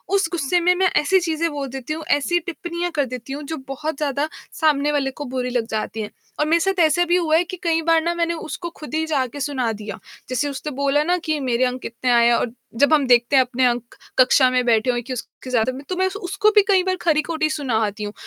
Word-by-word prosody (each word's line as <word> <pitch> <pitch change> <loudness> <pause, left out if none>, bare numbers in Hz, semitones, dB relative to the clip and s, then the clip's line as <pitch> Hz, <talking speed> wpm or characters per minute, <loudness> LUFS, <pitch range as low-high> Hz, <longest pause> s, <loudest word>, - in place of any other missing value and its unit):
उस 390 -4 +2
गुस्से 345 +1 +1
में 360 +1 +4
मैं 375 +1 +3
ऐसी 375 +6 +4
चीज़ें 330 -1 -1
बोल 285 -2 -4
देती 270 +3 -5
हूँ, 315 0 -6
ऐसी 345 +5 +2
टिप्पणियाँ 345 0 -4
कर 285 -2 +2
देती 255 +1 -7
हूँ 295 - -5
जो 315 +2 -5
बहुत 305 +3 -4
ज़्यादा 290 0 -1 0.3
सामने 295 -2 +2
वाले 275 -2 0
को 290 +2 -7
बुरी 250 -1 -2
लग 245 -2 -1
जाती 220 0 -3
हैं। 210 - -5 0.3
और 300 - +3
मेरे 330 +2 +3
साथ 385 +2 0
ऐसा 315 +3 +3
भी 345 - +2
हुआ 320 -3 +2
है 345 - +3
कि 360 +1 -7
कई 330 -1 +2
बार 330 0 +3
ना 340 +1 0
मैंने 340 0 0
उसको 340 +1 -6
खुद 300 -1 -9
ही 320 0 0
जाके 280 -3 -2
सुना 260 -4 -1
दिया, 210 0 -7 0.3
जैसे 255 +3 0
उसने 280 +2 -5
बोला 280 +1 +2
ना 355 +2 +1
कि 310 -2 0
मेरे 255 -1 +1
अंक 250 0 -3
कितने 245 +2 -2
आए 235 0 +5
है 240 - +5
और 235 - -1 0.2
जब 285 +5 +4
हम 290 -3 +4
देखते 245 +2 +4
हैं 260 - +7
अपने 255 +1 0
अंक 240 -1 -1 0.2
कक्षा 255 0 +6
में 255 0 +1
बैठे 235 +1 +2
हुए 240 - -2
कि 255 +2 -6
उसके 250 +2 -8
ज़्यादा 245 0 +1
मे 280 - -9
तो 370 - -1
मैं 375 +1 +2
उस 380 - -6
उसको 395 +2 +1
भी 415 - +8
कई 380 -2 +4
बार 370 0 0
खरी-खोटी 315 -1 +1
सुना 285 -7 -2
आती 210 0 -5
हूँ। 205 0 -5
290 Hz, 255 wpm, -21 LUFS, 255-335 Hz, 0.3 s, भी